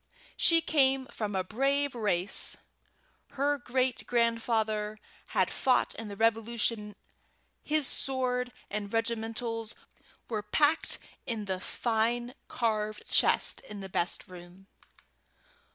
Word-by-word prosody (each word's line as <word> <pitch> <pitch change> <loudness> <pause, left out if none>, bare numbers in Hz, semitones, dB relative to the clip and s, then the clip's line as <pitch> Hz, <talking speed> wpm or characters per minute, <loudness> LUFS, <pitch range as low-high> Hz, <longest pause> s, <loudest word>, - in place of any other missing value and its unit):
She 330 -1 +5
came 270 -4 +3
from 210 -3 -3
a 190 - +1
brave 275 +7 +1
race. 205 -5 +1 0.8
Her 285 +1 +1
great 255 0 0
grandfather 225 -3 +1 0.3
had - - +1
fought 255 - +2
in 225 - -6
the 200 - -6
Revolution; 225 -1 0 0.7
his 305 -1 +1
sword 250 -2 0 0.2
and 205 -1 -3
regimentals 225 0 -1 0.5
were 215 -3 -2
packed 295 +9 +2 0.3
in 220 -3 -2
the 190 -2 -2
fine 235 +4 0
carved 215 -3 -1
chest - - +3
in 210 -1 -7
the 195 - -7
best 175 +1 0
room. 180 +1 -13
225 Hz, 110 wpm, -30 LUFS, 210-250 Hz, 0.8 s, She